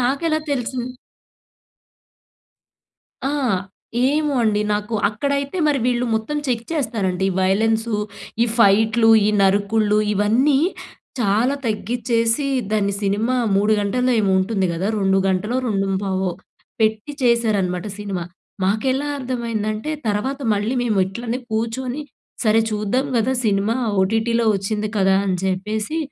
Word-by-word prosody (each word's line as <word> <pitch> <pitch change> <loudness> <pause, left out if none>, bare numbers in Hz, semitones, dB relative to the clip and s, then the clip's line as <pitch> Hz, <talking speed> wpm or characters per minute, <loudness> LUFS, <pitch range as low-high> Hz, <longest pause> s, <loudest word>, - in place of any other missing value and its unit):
నాకెలా 310 +6 +1
తెలుసిన్ 250 -2 -2 2.4
ఆ! - - -1 0.8
ఏమో 295 0 0
అండి? 210 -2 +2
నాకు 210 +2 -3
అక్కడైతే 280 - -2
మరి, 290 -2 +2
వీళ్ళు 245 0 +1
మొత్తం 220 +7 -2
చెక్ 235 -2 -1
చేస్తారండి. 200 - -1
వయలెన్సు, 220 +4 +1 0.5
ఈ - - +5
ఫైట్‌లు, 220 +2 +4 0.2
ఈ - - +3
నరుకుళ్లూ, 205 +2 +2 0.2
ఇవన్నీ 240 +8 +3 0.6
చాలా 225 +6 +2
తగ్గిచేసి, 230 +4 0 0.3
దాన్ని 200 -2 +1
సినిమా 215 +6 +1 0.2
3 210 +2 +3
గంటల్లో 250 +5 +1
ఏమో, 195 -2 +1
ఉంటుంది 190 -1 0
కదా! 185 +5 -2
2 195 -1 +2
గంటలో, 210 +6 0
రెండుం 195 -2 0
పావో 190 -1 -1 0.5
పెట్టి 220 +6 0
చేశారనమాట, 215 -6 +1
సినిమా. 195 -4 -4 0.4
మాకెలా 260 +8 0
అర్థమైందంటే, 230 -1 -3 0.2
తర్వాత 215 +7 -1 0.2
మళ్ళీ 210 +5 -1
మేము 215 -5 0
ఇట్లనే 235 +5 -4
కూర్చొని, 245 +5 -2 0.4
సరే! 220 +1 +4
చూద్దాం 215 +6 0
కదా! 260 +4 +1
సినిమా 205 +3 +1 0.3
ఓటీటీలో 225 +3 +1
వచ్చింది 210 +2 -2
కదా! 190 0 +4
అని 185 -1 +1
చెప్పేసి, 215 - -2
220 Hz, 115 wpm, -21 LUFS, 200-245 Hz, 2.4 s, ఈ